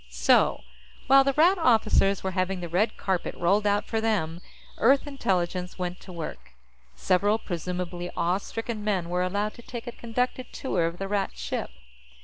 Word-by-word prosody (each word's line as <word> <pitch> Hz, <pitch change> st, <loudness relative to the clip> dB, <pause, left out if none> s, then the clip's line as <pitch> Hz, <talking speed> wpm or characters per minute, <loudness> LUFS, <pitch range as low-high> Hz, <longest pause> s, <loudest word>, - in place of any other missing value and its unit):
So, -, -, +3 dB, 0.4 s
while 270 Hz, 0 st, +7 dB
the 275 Hz, 0 st, +1 dB
Rat 350 Hz, +6 st, +4 dB
officers 215 Hz, -, +3 dB
were 190 Hz, -, -1 dB
having 185 Hz, 0 st, -1 dB
the 175 Hz, -, -5 dB
red 200 Hz, +7 st, 0 dB
carpet 190 Hz, -3 st, -2 dB
rolled 200 Hz, +4 st, +2 dB
out 205 Hz, +1 st, +1 dB
for 225 Hz, -1 st, -1 dB
them, 175 Hz, -7 st, -1 dB, 0.4 s
Earth 270 Hz, +5 st, +4 dB
Intelligence 180 Hz, -9 st, -2 dB
went 180 Hz, -1 st, -4 dB
to 190 Hz, -, -12 dB
work. 165 Hz, -, -7 dB, 0.4 s
Several 200 Hz, -, +2 dB
presumably 180 Hz, -2 st, -4 dB
awe 180 Hz, +3 st, +1 dB
stricken 225 Hz, +1 st, -5 dB
men 190 Hz, -5 st, -1 dB
were 180 Hz, +1 st, 0 dB
allowed 205 Hz, +3 st, -1 dB
to 235 Hz, -, -13 dB
take 235 Hz, 0 st, -7 dB
a 240 Hz, -, -5 dB
conducted 250 Hz, +2 st, -3 dB
tour 175 Hz, -10 st, -1 dB
of 170 Hz, +1 st, -5 dB
the 195 Hz, -, -4 dB
Rat 200 Hz, -1 st, -1 dB
ship. -, -, -3 dB
195 Hz, 170 wpm, -26 LUFS, 180-225 Hz, 0.4 s, while